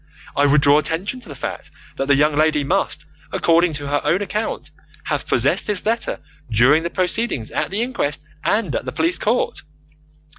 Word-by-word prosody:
I 145 Hz, 0 st, +4 dB
would 145 Hz, +1 st, +4 dB
draw 145 Hz, +1 st, +6 dB
attention 180 Hz, -, -2 dB
to 245 Hz, -, -13 dB
the 145 Hz, -, -7 dB
fact -, -, -6 dB, 0.3 s
that 135 Hz, -, -2 dB
the 140 Hz, -, +5 dB
young 150 Hz, +1 st, +3 dB
lady 155 Hz, -1 st, +2 dB
must, 140 Hz, -, -1 dB, 0.3 s
according 170 Hz, 0 st, +3 dB
to 145 Hz, -1 st, -6 dB
her 145 Hz, 0 st, +1 dB
own 170 Hz, +7 st, +1 dB
account, 210 Hz, +3 st, -4 dB, 0.3 s
have -, -, -3 dB
possessed -, -, +2 dB
this 205 Hz, -3 st, -1 dB
letter 230 Hz, +2 st, 0 dB, 0.3 s
during 125 Hz, +8 st, +4 dB
the 170 Hz, -, -3 dB
proceedings 185 Hz, -, -1 dB
at -, -, -1 dB
the 205 Hz, +4 st, -1 dB
inquest 150 Hz, -, -2 dB, 0.2 s
and 205 Hz, -, 0 dB
at -, -, -2 dB
the 130 Hz, -, -3 dB
police 165 Hz, +3 st, +1 dB
court. 230 Hz, +4 st, 0 dB
160 Hz, 185 wpm, -20 LUFS, 145-200 Hz, 0.3 s, draw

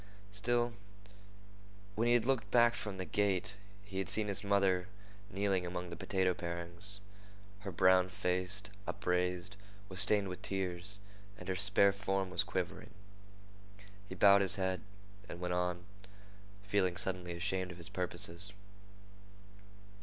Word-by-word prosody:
Still, 120 Hz, +3 st, 0 dB, 1.2 s
when 110 Hz, +4 st, +1 dB
he 120 Hz, -, +5 dB
had 120 Hz, -2 st, +2 dB
looked 135 Hz, -2 st, 0 dB
back 120 Hz, -1 st, +5 dB
from 105 Hz, -4 st, -4 dB
the 95 Hz, -, -3 dB
gate, 100 Hz, -1 st, +1 dB, 0.3 s
he 95 Hz, -2 st, -5 dB
had 95 Hz, -1 st, -2 dB
seen 105 Hz, +1 st, +2 dB
his 100 Hz, -, 0 dB
mother 95 Hz, -3 st, +2 dB, 0.4 s
kneeling 100 Hz, -2 st, 0 dB
among 90 Hz, 0 st, -4 dB
the -, -, -5 dB
potato 95 Hz, +1 st, +1 dB
parings. 85 Hz, +4 st, -2 dB, 0.6 s
Her 100 Hz, -1 st, -6 dB
brown 95 Hz, +1 st, +4 dB
face, 90 Hz, +2 st, -1 dB, 0.2 s
upraised, 90 Hz, +2 st, -1 dB, 0.3 s
was 95 Hz, 0 st, -5 dB
stained 100 Hz, 0 st, +4 dB
with 90 Hz, -1 st, -6 dB
tears, 95 Hz, 0 st, -2 dB, 0.4 s
and -, -, -10 dB
her 95 Hz, -, -1 dB
spare 100 Hz, +1 st, +6 dB
form 95 Hz, -1 st, -2 dB
was 90 Hz, -, +3 dB
quivering. 95 Hz, +2 st, -3 dB, 1.2 s
He 95 Hz, -, -6 dB
bowed 100 Hz, +1 st, +7 dB
his 95 Hz, 0 st, +3 dB
head 95 Hz, -2 st, -1 dB, 0.5 s
and -, -, -7 dB
went 90 Hz, 0 st, -2 dB
on, 90 Hz, 0 st, -1 dB, 0.8 s
feeling 100 Hz, -4 st, +1 dB
suddenly 90 Hz, -2 st, -3 dB
ashamed 95 Hz, +1 st, -1 dB
of 90 Hz, -, -10 dB
his 85 Hz, -1 st, -7 dB
purposes. 90 Hz, +1 st, -1 dB
95 Hz, 140 wpm, -34 LUFS, 90-100 Hz, 1.2 s, bowed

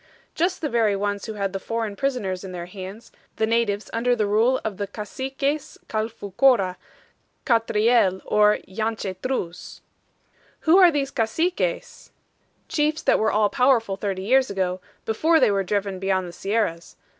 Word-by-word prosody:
"Just 355 Hz, +3 st, 0 dB
the 310 Hz, -, 0 dB
very 225 Hz, -4 st, +2 dB
ones 205 Hz, +1 st, -2 dB
who 220 Hz, -, -4 dB
had 200 Hz, -2 st, -3 dB
the 195 Hz, -, -2 dB
foreign 225 Hz, 0 st, -3 dB
prisoners 210 Hz, -9 st, -2 dB
in 190 Hz, -1 st, -7 dB
their 175 Hz, -1 st, -5 dB
hands, 190 Hz, +4 st, -9 dB, 0.2 s
the 220 Hz, -, +1 dB
natives 220 Hz, -2 st, 0 dB
under 245 Hz, +2 st, +2 dB
the 215 Hz, -3 st, 0 dB
rule 225 Hz, +6 st, +2 dB
of 210 Hz, -3 st, -3 dB
the 200 Hz, -, -3 dB
Caciques 270 Hz, +8 st, -4 dB
Calfoucoura, 215 Hz, -1 st, +1 dB, 0.7 s
Catriel, 225 Hz, -4 st, +3 dB
or 210 Hz, 0 st, +4 dB
Yanchetruz." 195 Hz, -2 st, -4 dB, 0.8 s
"Who 335 Hz, +4 st, +5 dB
are 365 Hz, -2 st, +8 dB
these 280 Hz, -4 st, -1 dB
Caciques?" 330 Hz, -, -2 dB, 0.6 s
"Chiefs 305 Hz, 0 st, 0 dB
that -, -, +3 dB
were 220 Hz, 0 st, +2 dB
all 210 Hz, -1 st, +3 dB
powerful 250 Hz, -6 st, +2 dB
thirty 195 Hz, -1 st, -3 dB
years 260 Hz, +5 st, +3 dB
ago, 185 Hz, -2 st, -2 dB, 0.2 s
before 320 Hz, +9 st, +3 dB
they 210 Hz, -, +4 dB
were 195 Hz, -1 st, +1 dB
driven 200 Hz, 0 st, -2 dB
beyond 190 Hz, -1 st, 0 dB
the 175 Hz, -, -9 dB
sierras. 195 Hz, -5 st, -2 dB
215 Hz, 150 wpm, -24 LUFS, 195-255 Hz, 0.8 s, are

